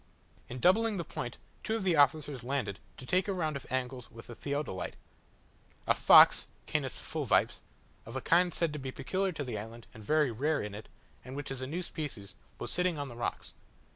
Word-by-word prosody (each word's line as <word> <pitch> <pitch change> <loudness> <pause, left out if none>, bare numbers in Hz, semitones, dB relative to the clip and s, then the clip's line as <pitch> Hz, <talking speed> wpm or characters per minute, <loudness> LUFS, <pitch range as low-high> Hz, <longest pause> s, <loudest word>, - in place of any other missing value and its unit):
In 125 - -5
doubling 210 - +4
the 170 - -2
point, 120 -4 -5 0.3
two 220 - 0
of 225 - -2
the 180 -3 +3
officers 145 -2 +3
landed 120 -7 -2 0.2
to 130 - -9
take 185 +7 +2
a 200 - 0
round 160 -5 -1
of 140 - -7
angles 130 -1 -3
with 115 0 -12
the 120 - -9
theodolite. 140 -6 -3 0.9
A - - +4
fox - - +7 0.2
(Canis - - -2
fulvipes), - - +1 0.5
of 115 - -8
a - - 0
kind 175 +4 +4
said 165 -2 0
to 150 - -4
be 130 -1 -5
peculiar 185 +9 -1
to 150 - -3
the 120 -5 -4
island, 115 +2 -9
and 110 - -11
very 150 +2 +3
rare 145 +7 0
in 105 -1 -4
it, 105 +1 -9 0.3
and 130 +2 -8
which 145 -1 -5
is 135 -1 -5
a 130 - -3
new 170 +6 -3
species, 135 - -6 0.2
was - - -4
sitting 180 -2 +1
on 145 -1 -4
the 120 - -9
rocks. 120 - -4
140 Hz, 205 wpm, -31 LUFS, 120-165 Hz, 0.9 s, fox